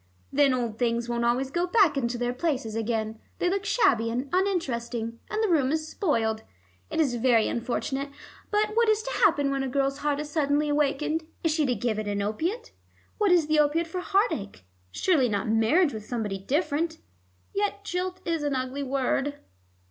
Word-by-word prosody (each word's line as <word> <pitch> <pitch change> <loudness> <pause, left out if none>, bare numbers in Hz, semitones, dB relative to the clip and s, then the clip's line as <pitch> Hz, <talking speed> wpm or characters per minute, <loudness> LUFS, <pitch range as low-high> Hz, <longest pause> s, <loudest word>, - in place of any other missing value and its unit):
Then 285 -1 +4
old 235 -4 -2
things 235 -1 0
won't 235 0 -1
always 255 +3 +1
go 345 +3 0
back 380 -5 +4
into 240 -3 -1
their 245 0 -1
places 255 -6 -2
again; 220 -1 -2 0.2
they - - 0
look 395 +1 -1
shabby 250 - +3
and 250 +4 -3
uninteresting, 240 - -1
and 430 +1 -1
the - - +3
room 290 -7 +2
is 310 0 -1
spoiled. 225 - 0 0.5
It - - -2
is 285 -6 +2
very 235 -2 +3
unfortunate. 270 +4 -2 0.4
But 420 0 +2
what 465 -1 +4
is 435 0 +2
to - - -4
happen 290 - +3
when 275 0 0
a 270 - -1
girl's 275 +1 0
heart 290 -1 0
is 300 - -4
suddenly 295 0 +1
awakened? 300 +2 0 0.2
Is 325 - +2
she 305 -3 +1
to 250 - +1
give 225 -3 -1
it 215 - -4
an 200 0 -1
opiate? 340 - -2 0.5
What 410 -3 +3
is 345 -3 +5
the 310 0 +2
opiate 300 +3 +3
for 330 +3 -5
heart 400 +6 +2
ache? 200 - -6 0.2
Surely 275 - +2
not 205 -1 -1
marriage 230 +10 +3
with 215 -1 -6
somebody 215 -5 -3
different. 305 - -1 0.6
Yet 405 0 -1
jilt 370 -1 -3
is 330 -2 0
an 290 -2 0
ugly 260 +2 -3
word." 275 +1 0
280 Hz, 190 wpm, -27 LUFS, 235-335 Hz, 0.6 s, is